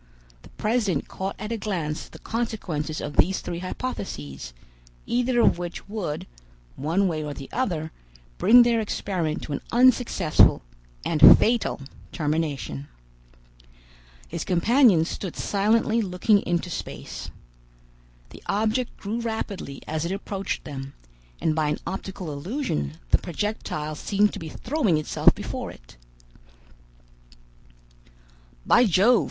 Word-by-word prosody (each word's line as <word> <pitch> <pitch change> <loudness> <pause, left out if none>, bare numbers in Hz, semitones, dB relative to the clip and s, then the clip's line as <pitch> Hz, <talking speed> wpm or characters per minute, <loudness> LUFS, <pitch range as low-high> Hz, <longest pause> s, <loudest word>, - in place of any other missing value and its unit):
The - - -16
president 210 - 0
caught 190 +1 -4
at 210 +2 -6
a 230 - -1
glance 175 -7 -3
the - - -12
consequences 180 -10 -3
of 145 - -6
these 190 +4 +4
three 170 - -5
hypotheses, 75 - -5 0.5
either 245 0 +1
of 175 - +4
which 175 -1 -6
would, 200 -8 -4 0.5
one 170 +8 +1
way 155 -3 -2
or 145 -1 -5
the 135 - -9
other, 170 -11 -1 0.5
bring 245 +2 +8
their 235 -1 +2
experiment 185 -7 -2
to 150 - -5
an - - -3
unsuccessful 240 - +4 0.4
and 155 -2 +9
fatal 230 -9 +1 0.3
termination. 150 - -2 1.4
His - - -4
companions 190 - +4
stood 185 -2 -5
silently 220 +3 +2
looking 200 +1 +2
into 175 0 -1
space. - - -6 1.0
The - - -12
object 220 +4 0
grew 215 +4 -3
rapidly 210 -10 -4
as 155 0 -2
it 170 - -2
approached 195 0 -3
them, 135 -2 -7 0.4
and 160 - +1
by 155 -1 +1
an - - 0
optical 190 -4 -5
illusion 140 - -3
the - - +5
projectile 170 -4 -3
seemed 205 +6 +1
to - - -5
be 160 - -6
throwing 230 - 0
itself 155 - +3
before - - -5
it. - - -14 2.7
"By 245 - +6
Jove!" 210 +5 +5
185 Hz, 125 wpm, -25 LUFS, 155-220 Hz, 2.7 s, and